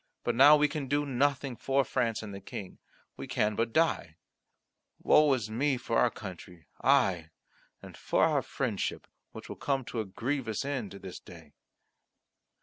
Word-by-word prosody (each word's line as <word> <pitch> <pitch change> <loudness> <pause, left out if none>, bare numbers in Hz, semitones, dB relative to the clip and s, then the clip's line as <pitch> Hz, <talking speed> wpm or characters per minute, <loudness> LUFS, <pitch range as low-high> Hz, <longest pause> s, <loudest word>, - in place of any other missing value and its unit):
But 120 - 0
now 140 +5 +8
we 150 0 +3
can 145 -2 -4
do 145 +2 +1
nothing 135 -1 0
for 135 +3 +1
France 115 -4 -1
and 105 -2 -7
the 100 - -8
King. 95 0 -8 0.4
We - - -7
can 105 0 0
but 115 +1 -1
die. 155 - +1 0.8
Woe 150 -1 +4
is 115 -5 -4
me 135 +4 +1
for 115 -1 -1
our 125 - +4
country, 90 -5 -10 0.2
aye, 95 - +3 0.5
and - - -11
for - - 0
our - - +3
friendship, - - -3 0.3
which - - -10
will - - -8
come 135 -3 -1
to 115 - -5
a 110 - -2
grievous 120 +4 -3
end 125 -9 -3
this 95 -2 -9
day." 80 -4 -14
120 Hz, 165 wpm, -30 LUFS, 100-140 Hz, 0.8 s, now